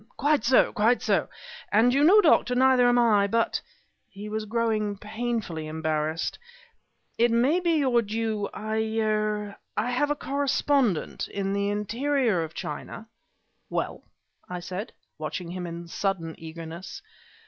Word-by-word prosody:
"Quite 290 -2 +2
so 250 +2 +4
quite 225 +4 +2
so! - - +1 0.4
And, 230 +4 +4
you 280 +2 +3
know, 395 +7 +7
Doctor, 275 -7 +4
neither 255 -1 +5
am 245 - +3
I; 215 -4 +4
but" 230 +3 0 0.5
he 205 +2 -8
was 215 0 -3
growing 215 -2 0
painfully 215 -7 -3
embarrassed 155 0 -2 0.8
"it 235 +1 +5
may 250 +9 +3
be 345 -2 +1
your 260 -6 +3
due 220 -1 -2
I 215 +1 -2 0.2
er 215 -2 -1 0.2
I 230 +4 0
have 285 +4 +1
a 295 - +1
correspondent, 275 - 0
in 195 -1 -3
the 200 0 0
interior 225 - 0
of 160 0 -8
China 220 +9 -6 0.3
" - - -47
"Well?" - - -3 0.5
I 180 0 -4
said, 185 +4 -6 0.3
watching 160 +3 -4
him 180 -1 -5
in 170 0 -7
sudden 170 -2 -2
eagerness. 165 +2 -8
215 Hz, 145 wpm, -26 LUFS, 185-245 Hz, 0.8 s, know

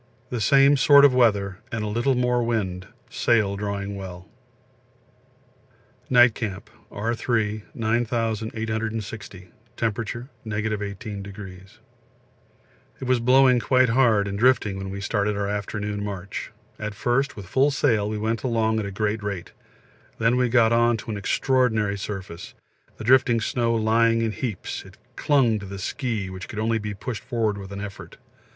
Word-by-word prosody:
The 120 -3 -2
same 140 +6 +5
sort 140 +1 +7
of 140 - +5
weather 100 -6 +2
and 110 -3 -2
a - - -2
little 120 +5 +1
more 125 0 +1
wind, 95 -6 -2 0.2
sail 105 -4 +1
drawing 100 0 -4
well. 95 -1 -8 1.8
Night 120 -2 +6
Camp 105 -5 -5 0.2
R. 115 +3 -2
3. 110 -3 -1
9860. 110 -3 -2 0.3
Temp. 110 -3 0
18°. 105 -4 -6 1.2
It - - -7
was 130 -1 +2
blowing 125 +1 +5
quite 130 0 +3
hard 115 -4 +3
and 100 0 -4
drifting 115 -5 +3
when 95 0 -5
we 100 +1 -5
started 105 0 0
our 100 0 -1
afternoon 105 0 -3
march. 100 -2 -5 0.3
At 105 -1 -4
first 130 +6 0
with 100 - -8
full 135 +10 +2
sail 115 -7 +1
we 110 - -3
went 110 +1 -1
along 110 -3 +1
at 105 - -3
a - - -6
great 105 +2 -1
rate; 100 -4 -5 0.7
then 115 +2 +2
we 125 -1 +2
got 115 -1 +4
on 120 0 +3
to 110 - -7
an 105 - -3
extraordinary 110 -1 +1
surface, 95 -3 -7 0.4
the - - -7
drifting 125 0 +4
snow 115 +1 0
lying 115 +1 +3
in 110 - 0
heaps; 110 -2 -4
it - - -16 0.2
clung 125 -7 +2
to 100 - -8
the 100 +1 -7
ski, 110 +1 -3
which 95 -1 -7
could 110 - -9
only 110 +1 0
be 105 -1 -5
pushed 115 +2 -5
forward 110 -5 -1
with 95 0 -9
an 100 - -6
effort. 100 -1 -9
110 Hz, 155 wpm, -24 LUFS, 100-120 Hz, 1.8 s, sort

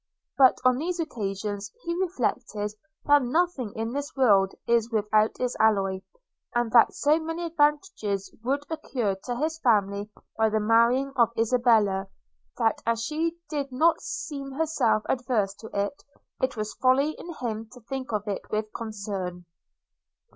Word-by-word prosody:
But 260 -2 +6
on 255 -1 +5
these 350 +3 -2
occasions 205 - -3
he 340 - -2
reflected 245 - -2 0.3
that 290 0 +6
nothing 270 - 0
in 225 +1 -3
this 285 +2 -4
world 200 -8 +4
is 235 -1 +2
without 215 0 +2
its 250 -1 -1
alloy; 195 -3 +2 0.5
and 240 -1 +1
that 230 -1 +6
so 300 +2 +3
many 325 +2 -4
advantages 290 - 0
would 280 +4 -1
accrue 245 -10 -1
to 245 - -2
his 315 +5 -2
family 205 -5 +1 0.3
by 220 0 +3
the 215 0 +1
marriage 235 +5 +3
of 235 -3 +4
Isabella, 225 -5 +3 0.5
that 225 - +1
as 230 0 0
she 325 +5 -1
did 285 -3 -3
not 320 +6 +3
seem 275 -3 -5
herself 300 -8 +1
averse 240 -6 0
to 225 - -10
it, 200 +7 -2 0.4
it 260 -2 0
was 215 0 -3
folly 265 +4 +3
in 340 - -7
him 225 -2 -4
to 250 - -13
think 260 +2 -5
of 210 -1 -2
it 200 - -2
with 215 0 -2
concern. 200 -5 -5
235 Hz, 150 wpm, -26 LUFS, 210-280 Hz, 0.5 s, But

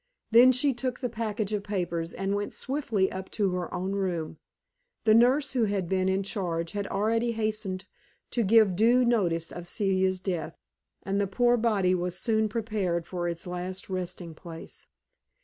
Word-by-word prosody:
Then 240 +3 +8
she 270 +2 +2
took 250 +1 -3
the 250 - -2
package 215 -2 -2
of 210 - 0
papers 175 -5 -2
and 195 +2 -2
went 205 0 -2
swiftly 235 -9 -1
up 190 0 -6
to 200 -3 +1
her 180 -1 -3
own 185 +2 -2
room. 180 -5 -2 0.6
The 220 - +5
nurse 260 +5 +4
who 245 -4 +2
had 200 -4 -1
been 185 +1 +1
in 190 +1 +1
charge 170 -4 -2
had 205 -1 -3
already 225 +4 0
hastened 215 -4 -2 0.5
to 240 - +1
give 215 -2 +5
due 240 +5 +4
notice 175 -9 +1
of 175 0 -7
Celia's 190 -1 +1
death, 180 -4 -3 0.5
and 195 +1 0
the 200 - 0
poor 240 +5 +3
body 210 -6 +2
was 180 0 -1
soon 220 -1 +1
prepared 205 -7 -1
for 175 -2 -3
its 170 -1 -4
last 180 +2 -5
resting 180 -2 -4
place. 165 0 -10
195 Hz, 170 wpm, -28 LUFS, 180-225 Hz, 0.6 s, Then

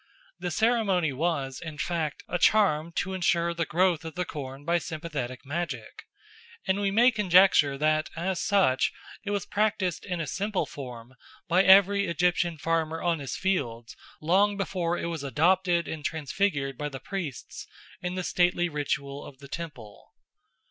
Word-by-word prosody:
The 180 - -3
ceremony 200 - +2
was, 140 -3 -2
in 160 -2 -7
fact, 160 -3 -2
a 175 - -2
charm 170 -6 +3
to 190 +2 -2
ensure 170 -2 +1
the 170 -2 -2
growth 175 -1 +2
of 160 0 -7
the 180 0 -1
corn 135 -2 -7
by 170 +1 +2
sympathetic 150 -7 -5
magic, 170 +5 -5 0.6
and 190 +1 +2
we 200 - +1
may 235 +6 +5
conjecture 185 - +4
that 155 +1 +1
as 175 +2 -2
such 195 -11 +2 0.3
it 200 - -5
was 205 -2 -1
practised 205 -4 0
in 180 -3 -4
a 165 - -2
simple 200 +5 -2
form 125 -3 -9 0.3
by 180 +3 +4
every 200 +1 +6
Egyptian 175 0 +1
farmer 165 +1 -1
on 170 -2 +1
his 135 -4 -5
fields 120 -12 -2 0.2
long 195 +6 +2
before 175 -3 -1
it - - -3
was 165 -4 -4
adopted 170 - +2
and 155 -2 -5
transfigured 145 -3 -1
by 150 0 -2
the 135 -2 -7
priests 170 - -6 0.3
in 180 0 -3
the 185 - -2
stately 175 0 +2
ritual 140 -2 -3
of 135 - -12
the 140 +1 -12
temple. 135 -10 -9
170 Hz, 160 wpm, -27 LUFS, 145-190 Hz, 0.6 s, every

